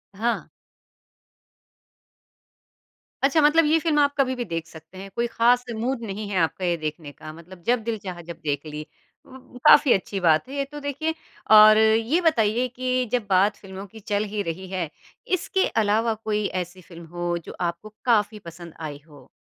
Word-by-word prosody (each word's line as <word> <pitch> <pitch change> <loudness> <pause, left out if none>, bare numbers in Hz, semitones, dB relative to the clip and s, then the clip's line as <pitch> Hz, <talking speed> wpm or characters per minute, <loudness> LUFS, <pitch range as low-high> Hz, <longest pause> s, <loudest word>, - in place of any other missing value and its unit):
हाँ। 235 +3 -1 2.8
अच्छा, 280 +3 +4
मतलब 300 +2 +5
ये 315 +2 +4
फ़िल्म 310 -2 +1
आप 285 0 +3
कभी 260 -2 +2
भी 245 -1 -4
देख 165 -4 -4
सकते 160 +3 -14
हैं, 195 +1 -8
कोई 235 0 0
ख़ास 240 +2 +3
मूड 240 +3 -2
नहीं 205 +1 -5
है 195 - -2
आपका 170 +3 0
ये 175 - +1
देखने 155 -1 -5
का 155 +2 -10
मतलब 175 +2 -14
जब 240 -2 +2
दिल 230 -1 -2
चाहा 180 -2 -6
जब 170 0 -10
देख 145 0 -2
ली। 150 0 -7 0.4
उ 255 -1 -14
काफ़ी 285 -3 +7
अच्छी 195 +1 -2
बात 160 +2 +3
है 280 - -7
ये 275 -1 -1
तो 295 - -7
देखिए 285 +3 -2 0.4
और 215 0 +9
ये 225 +8 +3
बताइए 240 -6 +2
कि 255 +1 -1
जब 245 -3 0
बात 195 +2 +3
फ़िल्मों 195 0 -9
की 220 - -12
चल 205 0 -1
ही 210 - -1
रही 175 +3 -5
है, 180 -4 -2 0.4
इसके 375 +1 0
अलावा 220 +2 +1
कोई 210 -1 -1 0.2
ऐसी 180 +1 -15
फ़िल्म 170 -1 -13
हो 175 0 -1
जो - - -9
आपको 175 +5 -4
काफ़ी 215 -2 +2
पसंद 170 0 -12
आई 150 -3 -6
हो? 145 -3 -17
210 Hz, 180 wpm, -24 LUFS, 175-250 Hz, 2.8 s, और